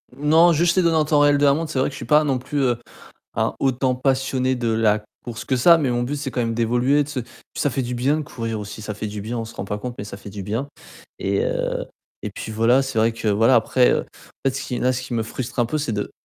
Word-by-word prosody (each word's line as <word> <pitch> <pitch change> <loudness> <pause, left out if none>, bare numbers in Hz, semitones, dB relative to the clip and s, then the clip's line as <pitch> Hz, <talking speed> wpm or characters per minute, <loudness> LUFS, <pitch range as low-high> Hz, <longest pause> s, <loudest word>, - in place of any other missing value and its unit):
Non, 160 +4 +5
juste 170 +3 +2
les 185 - +4
données 165 -1 +3
en 155 - +3
temps 150 -1 +3
réel 145 0 +5
de 145 - +3
la 140 - +6
montre, 160 +1 -2
c'est 130 - -1
vrai 130 - +2
que - - -12
je - - -8
suis - - -7
pas 150 0 +4
non 135 -3 +1
plus, 145 +3 -3
heu, 120 -3 +2 0.6
un - - 0
autant 130 -1 +1
passionné 130 0 0
de 120 -1 -2
la 110 -1 +2 0.2
course 115 -2 -6
que 130 - 0
ça, 170 +7 +6
mais 135 -5 0
mon 120 0 0
but 145 +4 -2
c'est 140 -2 -4
quand 125 - -2
même 115 -1 -1
d'évoluer, 125 +5 +2
de - - -12
se 135 -3 -3 0.4
ça 145 - +1
fait 130 - -1
du 125 0 -3
bien 135 +5 +1
de 155 - -2
courir 115 -6 -4
aussi, 105 +1 -7
ça 105 0 -5
fait 105 +1 -5
du 105 0 -5
bien, 115 +3 -4
on 115 - -3
se 110 - -11
rend 95 - -5
pas 105 +1 -4
compte, 125 +2 -5
mais 100 - -4
ça 100 - -8
fait 100 0 -10
du 100 -1 -6
bien. 115 +8 -3 0.5
Et, - - 0
heu, - - -1 0.4
et - - -4
puis - - -7
voilà, 115 +5 +3
c'est 135 -4 -3
vrai 115 +1 +3
que 115 -1 -3
voilà, 115 +5 +4
après, 125 +2 +3
heu, - - +2
en 135 - -6
fait 130 - -3
ce 135 - -3
qui 125 - -3
là 130 +1 +2
ce 130 +1 -3
qui 125 -2 -5
me 115 - +1
frustre 125 +3 -6
un 120 - +2
peu 155 +6 -2
c'est 145 -6 -2
de 105 0 -3
125 Hz, 300 wpm, -22 LUFS, 115-145 Hz, 0.6 s, la